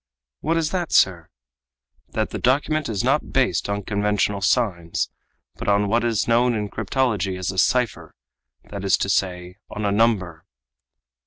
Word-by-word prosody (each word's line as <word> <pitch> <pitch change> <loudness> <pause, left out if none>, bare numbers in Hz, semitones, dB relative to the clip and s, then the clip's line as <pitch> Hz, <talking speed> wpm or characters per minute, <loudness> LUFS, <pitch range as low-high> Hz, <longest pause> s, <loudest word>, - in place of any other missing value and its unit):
"What 165 +1 0
is 160 -1 0
that, 180 -3 -2
sir?" 85 -4 +3 0.8
"That - - -2
the - - -4
document 145 +3 +1
is 100 -4 -1
not - - +1
based - - +1
on 100 0 -2
conventional 105 0 0
signs, 95 -6 0 0.5
but - - -6
on 100 0 +3
what 115 +2 +2
is 115 -3 0
known 120 +1 +3
in 105 -1 -3
cryptology 105 -4 -1
as 95 0 -2
a 95 - -2
cipher, 125 +1 0 0.6
that 100 -2 -6
is 95 - +3
to 100 - -2
say, 90 -1 -1
on 105 - -4
a 100 - +1
number." 100 -7 +1
105 Hz, 160 wpm, -22 LUFS, 95-120 Hz, 0.8 s, sir